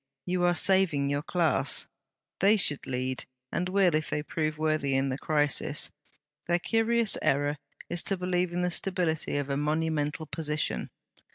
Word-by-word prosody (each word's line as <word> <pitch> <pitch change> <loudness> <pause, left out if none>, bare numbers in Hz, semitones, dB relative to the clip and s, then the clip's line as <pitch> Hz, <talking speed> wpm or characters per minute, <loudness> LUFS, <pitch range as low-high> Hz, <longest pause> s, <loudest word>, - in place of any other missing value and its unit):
You 180 0 -1
are 175 0 +3
saving 175 -8 +4
your 145 0 0
class. 170 0 +1 0.5
They 205 +3 +5
should 150 -7 +3
lead, 130 0 -3 0.3
and 180 +1 -1
will, 190 -3 +3
if 155 0 0
they 150 - -2
prove 155 0 -2
worthy 155 -3 0
in 135 +1 +1
the 130 - -2
crisis. 145 -1 -1 0.6
Their 175 0 +3
curious 225 +3 +1
error 145 +1 +1 0.3
is 175 -1 0
to 195 - -1
believe 180 -1 -1
in 175 +1 -1
the 180 - 0
stability 175 -5 -1
of 145 -1 -2
a 140 - 0
monumental 155 0 -1
position.' 150 -1 -1
160 Hz, 160 wpm, -28 LUFS, 145-180 Hz, 0.6 s, They